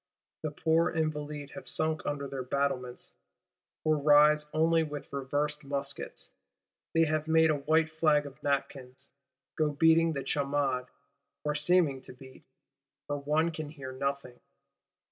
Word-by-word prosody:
The 155 - -2
poor 160 +3 +2
Invalides 150 -3 -3
have 185 - -9
sunk 155 0 -1
under 140 -1 -2
their 135 -1 -5
battlements, 125 -1 -2 0.7
or 155 -1 +2
rise 150 +1 +5
only 165 +1 +3
with 150 -3 -6
reversed 145 +2 -2
muskets: 140 0 -5 0.6
they 165 0 +5
have 155 0 -1
made 160 0 +5
a 150 - +1
white 155 +3 +2
flag 155 -2 +2
of 140 -1 -11
napkins; 135 -2 -3 0.4
go 155 -1 +1
beating 160 +2 +4
the 140 -2 -3
chamade, 140 -2 0 0.6
or 150 - 0
seeming 150 -3 +3
to 130 - -11
beat, 130 +1 -15 0.6
for 145 - -2
one 150 +4 +1
can 155 -2 -6
hear 140 -4 -8
nothing. 140 -1 -4
150 Hz, 140 wpm, -30 LUFS, 140-155 Hz, 0.7 s, rise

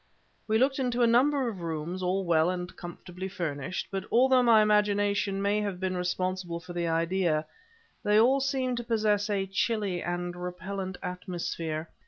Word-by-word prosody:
We 220 0 +3
looked 270 +3 +2
into 245 -2 +1
a - - +7
number 260 +3 +3
of 200 -6 -5
rooms 165 +2 -4
all 185 +2 0
well 165 -1 +3
and 180 0 -4
comfortably 180 +1 -7
furnished, 175 -3 -4
but 195 -1 -2
although 255 +1 +5
my 230 -3 +6
imagination 205 -1 +2
may 205 +1 +2
have 200 -3 -3
been 185 0 -1
responsible 180 -1 -2
for 170 +1 -10
the 170 -1 -1
idea, 165 -1 +1 0.6
they 210 +1 +4
all 260 +5 +5
seemed 265 -2 -1
to 240 - -3
possess 215 -3 +1
a 200 -2 0
chilly 195 -2 -1
and 175 0 -3
repellent 185 +1 -5
atmosphere. 170 -3 -4
190 Hz, 165 wpm, -28 LUFS, 175-215 Hz, 0.6 s, a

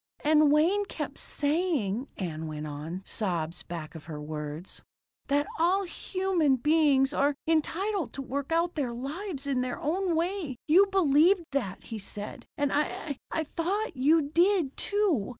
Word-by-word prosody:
"And 305 -1 +5
Wayne 350 +8 +3
kept - - -5
saying," 285 - 0
Ann 160 -4 -4
went 155 0 -5
on, 155 +5 -6
sobs 175 -5 -1
back 165 -3 -7
of 160 -3 -10
her 155 -2 -6
words, 150 +3 -6 0.5
"that 290 +1 +2
all 365 +4 +3
human 370 -5 0
beings 290 0 +3
are 285 0 +2
entitled 340 +4 0
to 275 - -5
work 275 +3 -4
out 335 +1 +2
their 265 -6 -2
lives 285 - -4
in 270 -3 0
their 250 -1 -3
own 350 +3 0
way. 335 -4 -1
You 370 +6 +6
believed 355 0 +4
that, 240 -10 -2
he 225 - -6
said. 205 +1 -6
And 285 -1 +1
I 290 -1 -1
I 320 - -1
thought 370 +8 -2
you 300 +5 +4
did, 335 0 +2
too. 400 - +1
290 Hz, 150 wpm, -28 LUFS, 225-345 Hz, 0.5 s, You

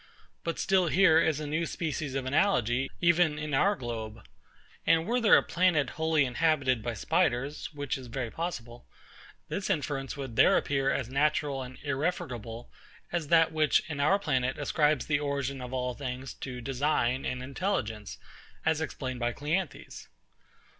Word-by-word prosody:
But 165 - -2
still 190 -2 +2
here 165 -1 +5
is 160 -3 +2
a 155 - -4
new 155 +3 -1
species 150 -4 -3
of 135 -1 -2
analogy, 130 - +2
even 170 -3 +3
in 155 -1 -4
our 200 +9 +3
globe. 115 - -6 0.6
And 165 0 +3
were 245 +4 0
there 220 - +7
a - - +2
planet 170 -7 +2
wholly 160 -2 +2
inhabited 135 -2 +1
by 120 +1 -3
spiders, 140 - 0
(which 145 -3 -3
is 130 - -10
very 120 -1 -4
possible,) 125 -9 -6 0.6
this 195 - -3
inference 145 -6 -2
would 130 -5 -6
there - - +6
appear 135 -1 0
as 135 -3 -1
natural 140 0 0
and 130 0 -8
irrefragable 130 -6 -3 0.4
as 170 -3 -2
that 165 0 +5
which 155 -2 +2
in 150 -3 -5
our 155 +8 +4
planet 130 -9 0
ascribes 150 -2 +1
the 145 -2 +1
origin 140 -2 -2
of 125 0 -7
all 125 -1 -2
things 130 0 -5
to 125 -2 -7
design 130 -1 0
and 125 0 -3
intelligence, 130 - -3 0.5
as 160 0 +2
explained 130 -4 -4
by 120 0 0
CLEANTHES. 155 +7 -4
140 Hz, 160 wpm, -29 LUFS, 125-160 Hz, 0.6 s, there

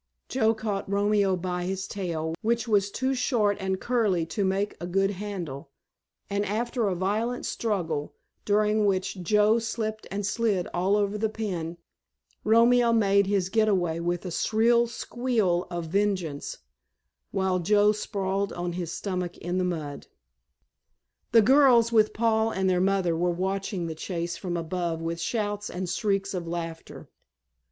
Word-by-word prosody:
Joe 225 -3 +2
caught 210 -3 -3
Romeo 200 -1 +2
by 180 0 -3
his 190 +1 -3
tail, 165 -5 -3
which 230 +1 0
was 205 -2 +2
too 260 +5 -1
short 235 -6 +1
and 190 -1 -1
curly 210 -9 +1
to 200 +5 -2
make 195 +2 0
a 175 - -4
good 195 +2 +1
handle, 180 -9 -6 0.6
and 200 0 -1
after 230 +3 -1
a 190 - 0
violent 215 +7 -1
struggle, 165 -10 -2 0.3
during 210 0 +2
which 190 -1 -1
Joe 210 +5 +3
slipped 220 -1 -4
and 200 +1 -3
slid 205 -4 0
all 185 +3 +2
over 205 0 0
the 220 +1 +1
pen, 180 -7 -4 0.7
Romeo 235 +2 +5
made 200 -3 +3
his 195 -2 +1
get 220 +1 +2
away 175 -5 +1
with 175 +1 -2
a 180 - -4
shrill 235 +6 +3
squeal 230 -7 -1
of 175 -1 -4
vengeance, 185 -5 -1 0.7
while 190 -1 0
Joe 205 +4 +4
sprawled 200 -1 -2
on 175 0 -3
his 175 -2 -4
stomach 180 -3 -3
in 175 +2 -2
the - - +1
mud. 155 -5 -4 1.2
The 225 -2 +6
girls, 250 -2 +5
with 215 -2 +4
Paul 220 0 +2
and 190 -3 -1
their 180 -1 +2
mother 190 -3 +2
were 175 +2 +1
watching 190 +1 -2
the 165 - -3
chase 170 +1 -4
from 175 -3 -3
above 170 0 -2
with 165 +1 -3
shouts 205 0 -2
and 180 +1 -4
shrieks 195 +1 -1
of 175 -2 -4
laughter. 165 -1 -6
195 Hz, 155 wpm, -27 LUFS, 175-215 Hz, 1.2 s, The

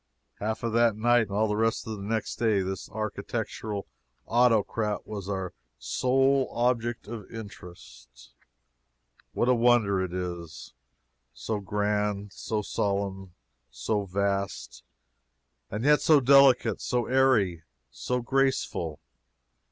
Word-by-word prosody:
Half 110 +2 -3
of 115 -1 -1
that 115 -2 +3
night, 120 +1 +3
and - - -21
all 105 +2 +1
of 110 +2 +1
the 110 -1 -5
next 110 +2 -3
day, 110 -4 +2
this 95 0 -5
architectural 110 -1 -4 0.4
autocrat 115 -3 +1
was 100 -2 -6
our 95 -2 -3 0.2
sole 135 +1 +1
object 120 -2 0
of 110 -3 -8
interest. 65 - -12 1.0
What 120 - 0
a 125 - +5
wonder 115 -5 +3
it 95 -2 -3
is! 85 -2 -6 0.6
So 110 -2 -3
grand, 105 0 -1
so 110 -1 -3
solemn, 100 -3 -2 0.3
so 100 - -2
vast! 100 0 -2 0.9
And 105 +3 -4
yet 150 0 +5
so 155 -2 +5
delicate, 135 -4 +5
so 120 -1 0
airy, 120 -10 +2 0.3
so 125 0 -2
graceful! 130 - 0
105 Hz, 115 wpm, -27 LUFS, 100-120 Hz, 1.0 s, a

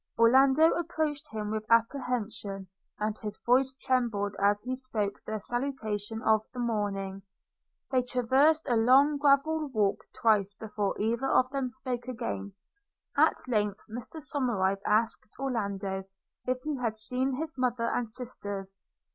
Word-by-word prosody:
Orlando 265 +7 +6
approached 310 -3 -2
him 210 -1 -3
with 215 0 -2
apprehension, 225 -5 0 0.3
and 210 0 -1
his 210 -1 -6
voice 260 +2 +3
trembled 235 -7 0
as 205 +1 +4
he 255 +2 -3
spoke 220 -6 -3
the 215 - -2
salutation 225 -2 -3
of 220 -1 +4
the - - -5
morning. 200 -4 -2 0.7
They 255 -1 +3
traversed 265 +6 +3
a 245 - +2
long 270 +6 +5
gravel 295 +2 +3
walk 215 -7 0 0.2
twice 205 -3 +3
before 210 -1 -3
either 235 +5 0
of 255 0 +3
them 270 -2 -1
spoke 250 -1 -5
again. 100 - -4 0.6
At - - +4
length 210 -4 0
Mr 240 +8 -7
Somerive 200 -10 0
asked 215 0 +1
Orlando, 200 -7 -2 0.4
if 255 0 0
he 300 -2 -2
had 230 -3 -2
seen 255 +4 -1
his 320 +3 -4
mother 245 -2 0
and 240 -3 -1
sisters? 205 -5 -5
235 Hz, 140 wpm, -29 LUFS, 210-260 Hz, 0.7 s, Orlando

